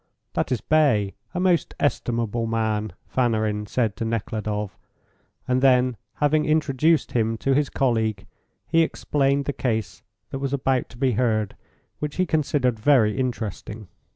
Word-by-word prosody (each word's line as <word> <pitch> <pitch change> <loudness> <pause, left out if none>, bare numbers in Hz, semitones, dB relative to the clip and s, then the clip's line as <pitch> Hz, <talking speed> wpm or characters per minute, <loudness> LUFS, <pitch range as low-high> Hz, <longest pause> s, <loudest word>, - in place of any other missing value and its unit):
"That - - -1
is 125 - 0
Bay, 130 -11 +2 0.2
a - - 0
most 180 -2 +1
estimable 120 -5 0
man," 110 -3 -1
Fanarin 110 -4 0
said 110 -2 0
to - - -3
Nekhludoff, 105 -2 -3 0.7
and 130 0 +2
then 130 -2 +4 0.2
having 150 +1 +2
introduced 155 0 +2
him 115 -1 0
to 135 +4 +1
his 145 +1 +2
colleague, 110 -6 0 0.4
he 165 0 +3
explained 140 -3 +1
the 145 - -1
case 110 -9 -2 0.3
that 135 - -4
was 140 0 -2
about 135 -2 0
to 115 - -14
be 130 0 +2
heard, 110 -3 0 0.4
which 150 -1 -4
he 185 - +2
considered 140 -7 +1
very 110 -5 +4
interesting. 110 -4 -4
125 Hz, 145 wpm, -24 LUFS, 110-140 Hz, 0.7 s, then